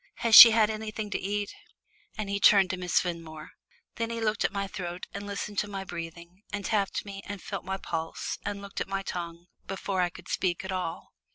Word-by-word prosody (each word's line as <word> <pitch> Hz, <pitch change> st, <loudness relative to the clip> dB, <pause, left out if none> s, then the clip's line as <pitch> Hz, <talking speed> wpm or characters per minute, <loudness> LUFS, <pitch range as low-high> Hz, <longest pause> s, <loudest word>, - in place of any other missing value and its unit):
Has 230 Hz, -, +2 dB
she 230 Hz, -, +14 dB
had 220 Hz, -1 st, +3 dB
anything 215 Hz, -1 st, -5 dB
to -, -, -1 dB
eat?" 205 Hz, +1 st, -3 dB, 0.6 s
and 215 Hz, -2 st, -3 dB
he 200 Hz, 0 st, -2 dB
turned 195 Hz, -2 st, +6 dB
to -, -, -2 dB
Miss 180 Hz, -1 st, +1 dB
Fenmore. 165 Hz, -3 st, -6 dB, 0.5 s
Then 230 Hz, -1 st, -2 dB
he 230 Hz, 0 st, -4 dB
looked 215 Hz, -1 st, 0 dB
at -, -, +1 dB
my 200 Hz, 0 st, -2 dB
throat 180 Hz, -2 st, -6 dB
and 200 Hz, +1 st, -6 dB
listened 200 Hz, 0 st, -3 dB
to 210 Hz, -, -1 dB
my 195 Hz, -1 st, -5 dB
breathing, 170 Hz, +1 st, -8 dB
and 205 Hz, -2 st, -4 dB
tapped 205 Hz, -2 st, 0 dB
me 195 Hz, -1 st, -7 dB
and 200 Hz, 0 st, -5 dB
felt 195 Hz, +2 st, -6 dB
my 190 Hz, 0 st, -2 dB
pulse 165 Hz, -3 st, -4 dB
and 200 Hz, 0 st, -4 dB
looked 200 Hz, -, -6 dB
at -, -, -2 dB
my 195 Hz, 0 st, -3 dB
tongue 170 Hz, -2 st, -6 dB, 0.2 s
before 195 Hz, -1 st, -2 dB
I 175 Hz, -, +1 dB
could -, -, -14 dB
speak 180 Hz, 0 st, -1 dB
at 190 Hz, -, -4 dB
all. 180 Hz, -3 st, -4 dB
195 Hz, 215 wpm, -28 LUFS, 180-205 Hz, 0.6 s, she